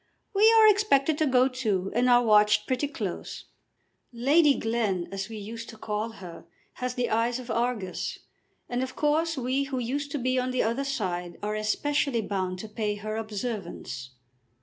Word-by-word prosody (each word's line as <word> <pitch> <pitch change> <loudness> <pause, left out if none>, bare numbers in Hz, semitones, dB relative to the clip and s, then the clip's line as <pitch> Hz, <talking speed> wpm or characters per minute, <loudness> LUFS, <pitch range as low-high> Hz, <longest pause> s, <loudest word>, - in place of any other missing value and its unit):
"We 425 +3 +6
are 440 -1 +8
expected 325 -9 +3
to 310 - +3
go 255 -1 +4
too, 215 -8 -1
and 245 +2 +2
are 245 0 +6
watched 210 -1 +4
pretty 260 +3 0
close. 285 - -5 0.7
Lady 280 +5 +4
Glen, 220 -6 -1
as 195 +1 -4
we 220 - -7
used 230 +3 -7
to 220 - -10
call 215 +1 -3
her, 180 -5 -10 0.4
has 250 0 -2
the 245 -1 -1
eyes 230 +2 +1
of 250 -2 -7
Argus. 230 -5 -2 0.5
And 245 +1 -2
of 260 0 -4
course 315 +2 +1
we 260 +2 0
who 270 -1 -4
used 275 +4 -2
to - - 0
be 255 0 +1
on 250 0 -1
the 255 0 +1
other 235 +5 -1
side 180 -10 -3
are 210 0 -1
especially 235 +4 0
bound 185 -2 -2
to 220 - -7
pay 210 -1 -2
her 215 +1 -5
observance." 205 - -5
235 Hz, 175 wpm, -27 LUFS, 210-270 Hz, 0.7 s, are